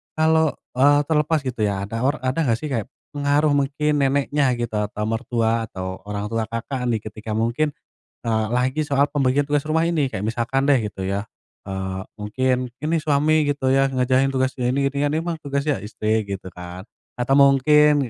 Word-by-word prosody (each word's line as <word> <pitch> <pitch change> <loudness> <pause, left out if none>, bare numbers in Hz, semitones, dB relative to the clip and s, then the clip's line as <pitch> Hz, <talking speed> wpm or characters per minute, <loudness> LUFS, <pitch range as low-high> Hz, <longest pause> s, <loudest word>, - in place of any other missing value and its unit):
kalau, 160 0 +3 0.2
eee, 145 +3 +4
terlepas 150 0 +1
gitu 125 -3 -5
ya, 100 -1 -2
ada 115 +3 -4
or 135 +4 +1
ada 135 +4 0
gak 115 - +3
sih 145 +4 -6
kayak 115 -5 -2 0.2
pengaruh 145 +1 +2
mungkin 145 +2 +1
neneknya 140 -1 +2
gitu 120 -1 -3
atau 105 0 -3
mertua 115 0 0
atau 95 0 -6
orang 105 +1 -4
tua 115 -1 -1
Kakak 125 +3 -3
nih 115 -2 +1
ketika 110 0 -6
mungkin, 120 +7 0 0.5
eee, 110 -1 +1
lagi 130 +5 +1
soal 140 -1 +2
pembagian 140 0 +1
tugas 145 -1 +1
rumah 160 +2 +1
ini? 150 -6 0
Kayak 100 +3 -3
misalkan 120 +4 0
deh 145 - +6
gitu 95 -2 -4
ya, 100 +1 -1 0.4
eee, 95 -1 -4 0.2
mungkin 125 +4 0 0.2
ini 165 +2 +1
suami 150 0 +2
gitu 140 -2 0
ya 135 0 +4
ngerjain 130 0 +2
tugas 130 0 +1
ini 135 +3 +1
ini 140 - -6
kan - - -2
emang 165 0 -2
tugas 140 -1 -2
ya 150 -8 0
istri 110 +1 -1
gitu 95 -2 -6
kan 90 +1 -9 0.3
atau 130 +3 +2
mungkin 140 0 +5
130 Hz, 180 wpm, -22 LUFS, 110-145 Hz, 0.5 s, deh